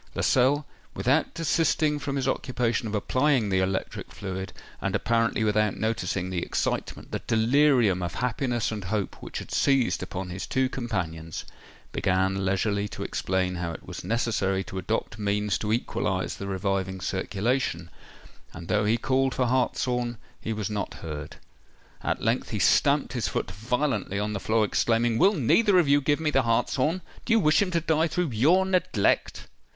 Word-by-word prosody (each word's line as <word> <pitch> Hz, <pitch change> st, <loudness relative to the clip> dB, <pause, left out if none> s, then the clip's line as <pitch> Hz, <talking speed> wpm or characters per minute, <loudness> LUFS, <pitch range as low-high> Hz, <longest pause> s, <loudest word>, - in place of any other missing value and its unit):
Lascelles, 135 Hz, +4 st, +3 dB, 0.3 s
without 135 Hz, +6 st, +2 dB
desisting 160 Hz, -2 st, +1 dB
from 140 Hz, -1 st, -3 dB
his 135 Hz, -, -1 dB
occupation 120 Hz, -3 st, 0 dB
of 105 Hz, -, -3 dB
applying 130 Hz, +1 st, +2 dB
the 95 Hz, -1 st, +2 dB
electric 95 Hz, 0 st, -2 dB
fluid, 95 Hz, -1 st, -5 dB, 0.3 s
and -, -, -1 dB
apparently 115 Hz, -1 st, +1 dB
without 105 Hz, -1 st, +1 dB
noticing 95 Hz, -4 st, -1 dB
the 90 Hz, -2 st, -1 dB
excitement—the -, -, -2 dB
delirium 115 Hz, -4 st, +3 dB
of 85 Hz, 0 st, -3 dB
happiness 125 Hz, -1 st, -1 dB
and 105 Hz, -4 st, -5 dB
hope 100 Hz, +1 st, -3 dB
which -, -, -6 dB
had -, -, -7 dB
seized 135 Hz, -3 st, +2 dB
upon 90 Hz, -1 st, -5 dB
his 90 Hz, +2 st, -5 dB
two 130 Hz, 0 st, +1 dB
companions, 85 Hz, -11 st, -4 dB, 0.5 s
began 95 Hz, +1 st, +1 dB
leisurely 100 Hz, +2 st, 0 dB
to -, -, -6 dB
explain 90 Hz, -1 st, -1 dB
how 85 Hz, -1 st, -3 dB
it -, -, -10 dB
was -, -, -7 dB
necessary 95 Hz, -2 st, 0 dB
to 95 Hz, +1 st, -6 dB
adopt 110 Hz, +2 st, -3 dB
means 105 Hz, 0 st, 0 dB
to 105 Hz, -, -2 dB
equalise 105 Hz, -4 st, -1 dB
the 100 Hz, -, -6 dB
reviving 95 Hz, 0 st, -1 dB
circulation; 95 Hz, -2 st, -1 dB, 0.6 s
and 85 Hz, 0 st, -9 dB
though 105 Hz, 0 st, +2 dB
he 110 Hz, +3 st, +3 dB
called 130 Hz, +2 st, +1 dB
for 130 Hz, -, +1 dB
hartshorn, 125 Hz, -1 st, 0 dB, 0.2 s
he 115 Hz, -, -3 dB
was 105 Hz, -2 st, -2 dB
not 105 Hz, -2 st, -3 dB
heard. 75 Hz, -2 st, -7 dB, 0.7 s
At -, -, -2 dB
length -, -, 0 dB
he -, -, -2 dB
stamped -, -, +3 dB
his -, -, -1 dB
foot -, -, -2 dB
violently 115 Hz, -3 st, -1 dB
on 105 Hz, +1 st, -1 dB
the 100 Hz, -, -2 dB
floor, 110 Hz, +2 st, +2 dB
exclaiming, 115 Hz, +2 st, +1 dB
"Will 200 Hz, +3 st, +5 dB
neither 190 Hz, -, +4 dB
of 175 Hz, -5 st, +4 dB
you 145 Hz, +1 st, +4 dB
give 145 Hz, +2 st, +1 dB
me 155 Hz, -2 st, 0 dB
the 135 Hz, -, +4 dB
hartshorn? 130 Hz, +8 st, +1 dB, 0.2 s
Do 230 Hz, -, +1 dB
you 225 Hz, -, +5 dB
wish 155 Hz, -3 st, +4 dB
him 200 Hz, -, +1 dB
to 170 Hz, -2 st, +1 dB
die 160 Hz, 0 st, +2 dB
through 175 Hz, -3 st, -1 dB
your 160 Hz, +12 st, +4 dB
neglect?" 185 Hz, -, +1 dB
110 Hz, 165 wpm, -26 LUFS, 95-135 Hz, 0.7 s, Will